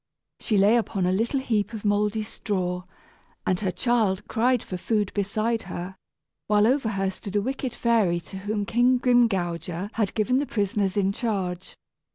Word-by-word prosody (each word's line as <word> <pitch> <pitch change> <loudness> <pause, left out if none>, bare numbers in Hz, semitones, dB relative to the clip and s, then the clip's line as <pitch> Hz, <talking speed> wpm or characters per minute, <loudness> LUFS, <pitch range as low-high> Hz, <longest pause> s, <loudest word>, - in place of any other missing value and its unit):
She 215 - 0
lay 205 +4 +5
upon 200 -5 -1
a 180 - +2
little 230 +8 +1
heap 220 -4 -1
of 220 -1 -6
mouldy 210 +1 +1
straw, 180 -4 -3 0.6
and 185 -1 +1
her 195 - -1
child 210 -1 +1
cried 245 +1 +2
for 185 - -6
food 205 +2 -1
beside 215 +3 0
her, 180 +2 -5 0.5
while 210 0 +4
over 255 -1 +2
her 195 -2 -1
stood 195 +1 -8
a 205 - +3
wicked 260 0 -3
fairy 215 -8 +2
to 190 - -10
whom 205 +1 -2
King 245 +4 +3
Grimgouger 195 -7 +1
had 215 -4 -1
given 245 +4 +2
the 285 - -2
prisoners 200 -1 0
in 195 -1 +2
charge. 190 -5 -3
210 Hz, 170 wpm, -25 LUFS, 190-230 Hz, 0.6 s, lay